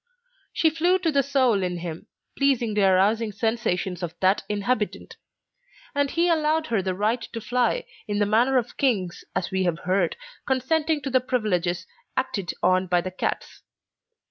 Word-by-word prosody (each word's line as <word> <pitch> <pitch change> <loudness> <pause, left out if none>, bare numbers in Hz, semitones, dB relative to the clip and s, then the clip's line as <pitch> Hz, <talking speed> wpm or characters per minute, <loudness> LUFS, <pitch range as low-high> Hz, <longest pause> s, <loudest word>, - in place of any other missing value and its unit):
She 320 - +2
flew 345 +4 +2
to 340 -3 0
the 280 -1 +3
soul 260 -7 +2
in 180 -1 -2
him, 170 -1 -6 0.3
pleasingly 240 -7 +1
arousing 200 +4 +3
sensations 200 -4 -1
of 175 -2 -4
that 190 +2 +3
inhabitant; 210 +1 -2 0.8
and 285 -1 +1
he 340 +4 +1
allowed 315 -1 +2
her 225 -9 0
the 185 -1 -2
right 215 +5 0
to 230 - -6
fly, 245 +1 0 0.2
in 205 -1 -1
the 205 - +3
manner 235 +6 +3
of 240 -1 -2
kings, 200 -10 0
as 185 - -1
we 190 0 0
have 170 -2 0
heard, 185 -1 +1 0.3
consenting 300 +4 +1
to 270 - -3
the 255 0 +3
privileges 185 -9 -1 0.3
acted 200 -9 -1
on 185 0 +3
by 175 -1 +2
cats. 185 0 -4
220 Hz, 160 wpm, -25 LUFS, 185-270 Hz, 0.8 s, the